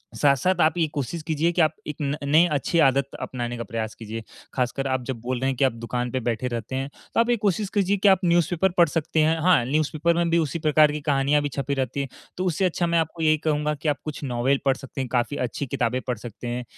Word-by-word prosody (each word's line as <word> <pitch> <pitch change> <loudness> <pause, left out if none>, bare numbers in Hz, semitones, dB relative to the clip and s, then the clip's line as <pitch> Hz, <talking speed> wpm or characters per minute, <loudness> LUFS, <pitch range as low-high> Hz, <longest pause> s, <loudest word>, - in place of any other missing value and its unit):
साथ-साथ 150 +6 +2
आप 160 +2 +3
ये 165 - +3
कोशिश 145 +3 -3
कीजिए 160 +1 0
कि 175 0 +1
आप 155 0 +3
एक 150 - -4
न 145 0 -1
नए 155 +5 +5
अच्छी 150 +3 0
आदत 135 -1 +3
अपनाने 120 -1 -4
का 115 - -4
प्रयास 115 -1 -4
कीजिए। 110 0 -7 0.3
खासकर 135 +2 -1
आप 130 -1 0
जब 130 -3 -4
बोल 125 +1 -2
रहे 135 +1 0
हैं 135 - -1
कि - - +2
आप 130 - +2
दुकान 120 +1 -3
पे 130 - -1
बैठे 120 +1 -2
रहते 120 +1 -4
हैं, 135 +1 -2 0.2
तो - - +1
आप 230 +1 +3
ये 240 - +4
कोशिश 205 0 0
कीजिए 200 -1 +2
कि 200 - +2
आप 190 -2 +5
न्यूज़पेपर 175 +1 +2
पढ़ 170 -2 +6
सकते 160 0 -1
हैं। 160 +1 +2
हाँ, 175 -6 +4
न्यूज़पेपर 155 +4 +1
में 170 0 +1
भी 170 - +3
उसी 160 0 -1
प्रकार 155 -1 +4
की 150 0 -4
कहानियाँ 145 0 +2
भी 145 - -1
छपी 140 +2 -3
रहती 135 +1 -2
हैं, 135 - -4 0.3
तो 185 - -1
उससे 180 +1 +1
अच्छा 175 -1 0
मैं 170 0 +2
आपको 160 +1 -3
यही 155 0 +4
कहूँगा 150 -1 0
कि 150 +2 -2
आप 145 - 0
कुछ 150 -1 -6
नोवेल 130 +2 +1
पढ़ 135 -1 +3
सकते 135 0 -7
हैं, 130 - -3
काफ़ी 125 +3 0
अच्छी 125 +3 -3
किताबें 125 0 -1
पढ़ 125 -2 -1
सकते 120 +2 -8
हैं 120 +1 -3
145 Hz, 255 wpm, -24 LUFS, 130-165 Hz, 0.3 s, पढ़